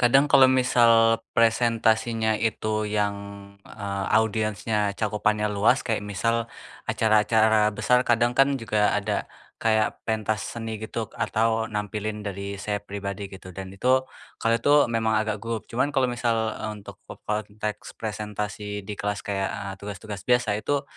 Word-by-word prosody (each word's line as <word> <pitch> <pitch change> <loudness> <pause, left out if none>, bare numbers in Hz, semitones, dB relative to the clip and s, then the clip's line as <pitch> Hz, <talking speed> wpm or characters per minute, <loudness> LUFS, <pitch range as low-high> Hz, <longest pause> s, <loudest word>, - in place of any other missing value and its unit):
Kadang 135 +4 +5
kalau 135 -1 +8
misal 125 -2 +4 0.4
presentasinya 115 -1 +2 0.2
itu 110 0 -5 0.3
yang, 100 -1 +1 0.6
eee, 100 -1 -3
audiensnya 110 0 -1 0.2
cakupannya 105 0 +1
luas 115 +6 +4
kayak 110 -2 0
misal 115 +5 +1 0.5
acara-acara 110 0 +3 0.2
besar, 125 0 +3
kadang 120 +1 +3
kan 135 +1 +6
juga 110 -2 -1 0.2
ada 105 0 -1 0.5
kayak 110 -1 +3 0.2
pentas 110 -1 -1
seni 115 -1 -5
gitu 115 - -4 0.2
atau 115 +1 +1 0.2
nampilin 105 +1 -3
dari 100 0 -5 0.2
saya 105 -1 -2
pribadi 100 0 -5
gitu 95 -1 -11
dan 95 -1 -6
itu, 125 +6 +2 0.5
kalau 115 0 +3
itu 145 - +3 0.2
memang 110 -1 +1
agak 110 -1 -2
gugup, 115 -1 -3
cuman 125 +4 +1
kalau 130 -1 +3
misal, 120 -1 0 0.2
eee, 110 - -4
untuk - - -11
ke - - -8
konteks 105 0 -4
presentasi 105 -1 -4
di 105 - -3
kelas 105 0 -2
kayak, 95 -1 -2
eee, 100 -2 -5
tugas-tugas 100 0 -7
biasa, 120 -4 +2
itu, 140 +5 -1
110 Hz, 145 wpm, -25 LUFS, 105-115 Hz, 0.6 s, kalau